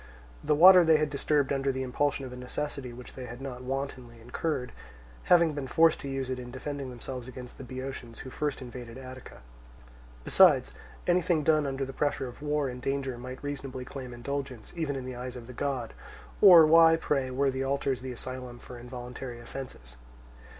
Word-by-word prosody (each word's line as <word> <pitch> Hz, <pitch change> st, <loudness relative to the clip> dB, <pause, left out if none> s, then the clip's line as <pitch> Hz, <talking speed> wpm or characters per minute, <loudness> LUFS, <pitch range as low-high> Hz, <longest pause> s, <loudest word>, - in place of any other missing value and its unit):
The 150 Hz, 0 st, +2 dB
water 180 Hz, +3 st, +9 dB
they 160 Hz, -1 st, +5 dB
had 150 Hz, -1 st, 0 dB
disturbed 145 Hz, -1 st, +1 dB
under 135 Hz, 0 st, +1 dB
the 130 Hz, 0 st, -3 dB
impulsion 135 Hz, +2 st, -1 dB
of 125 Hz, -, -8 dB
a -, -, -7 dB
necessity 125 Hz, +1 st, -5 dB
which 125 Hz, +1 st, -11 dB
they 130 Hz, -1 st, -7 dB
had 120 Hz, +1 st, -8 dB
not 130 Hz, -2 st, -6 dB
wantonly 130 Hz, -2 st, -5 dB
incurred, 125 Hz, +3 st, -3 dB, 0.5 s
having 170 Hz, -3 st, +5 dB
been 145 Hz, -2 st, -4 dB
forced 160 Hz, +5 st, +4 dB
to 140 Hz, -, -6 dB
use 135 Hz, -1 st, -2 dB
it 130 Hz, -, -3 dB
in 125 Hz, -1 st, -8 dB
defending 135 Hz, +1 st, -5 dB
themselves 125 Hz, 0 st, -7 dB
against 125 Hz, -1 st, -10 dB
the -, -, -6 dB
Boeotians 130 Hz, -2 st, -7 dB
who 130 Hz, -, -8 dB
first 145 Hz, -2 st, -3 dB
invaded 120 Hz, -1 st, -9 dB
Attica. 130 Hz, -, -10 dB, 0.8 s
Besides, 150 Hz, -, +5 dB, 0.3 s
anything 175 Hz, -3 st, +2 dB
done 155 Hz, -1 st, +3 dB
under 135 Hz, 0 st, -2 dB
the 135 Hz, -, -8 dB
pressure 145 Hz, -2 st, -1 dB
of 125 Hz, -, -11 dB
war 150 Hz, -1 st, 0 dB
and 125 Hz, -1 st, -6 dB
danger 135 Hz, -1 st, -2 dB
might 130 Hz, +2 st, -8 dB
reasonably 135 Hz, -3 st, -5 dB
claim 130 Hz, -1 st, -7 dB
indulgence 130 Hz, -1 st, -5 dB
even 160 Hz, -4 st, -2 dB
in 130 Hz, -1 st, -5 dB
the 130 Hz, -, -5 dB
eye 125 Hz, +1 st, -5 dB
of 125 Hz, -2 st, -8 dB
the 125 Hz, -, -10 dB
god; 130 Hz, -3 st, -3 dB, 0.5 s
or 175 Hz, -5 st, +10 dB
why, 165 Hz, +1 st, +7 dB
pray, 140 Hz, -5 st, -1 dB
were 135 Hz, +2 st, +1 dB
the 130 Hz, 0 st, -2 dB
altars 135 Hz, -1 st, -1 dB
the 130 Hz, 0 st, -5 dB
asylum 125 Hz, 0 st, -6 dB
for 120 Hz, 0 st, -11 dB
involuntary 125 Hz, 0 st, -7 dB
offences? 120 Hz, -, -9 dB
130 Hz, 190 wpm, -29 LUFS, 125-145 Hz, 0.8 s, or